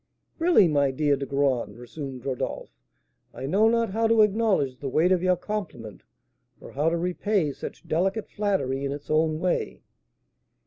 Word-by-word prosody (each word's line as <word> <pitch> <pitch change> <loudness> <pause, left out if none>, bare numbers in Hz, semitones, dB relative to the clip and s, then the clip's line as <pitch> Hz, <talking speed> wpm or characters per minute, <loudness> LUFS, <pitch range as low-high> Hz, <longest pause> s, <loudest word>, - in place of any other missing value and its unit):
"Really, 330 - +5
my 145 -3 +2
dear 145 +2 +1
De 140 0 -5
Graün," 135 -6 0
resumed 130 +1 -8
Rodolph, 130 -2 -4 0.6
"I - - -6
know 200 +10 +3
not 230 -2 +1
how 225 +3 +1
to 225 -1 +5
acknowledge 200 - +1
the 140 - -4
weight 165 +7 +2
of 185 -2 +3
your 185 0 +3
compliment, 175 - -6 0.6
or - - -12
how 150 +4 +1
to 170 - -1
repay 180 -1 0
such - - -9
delicate 190 +7 0
flattery 190 -11 -1
in 140 - -2
its 145 +1 -8
own 155 0 +2
way." 180 0 -2
160 Hz, 165 wpm, -25 LUFS, 140-200 Hz, 0.6 s, Really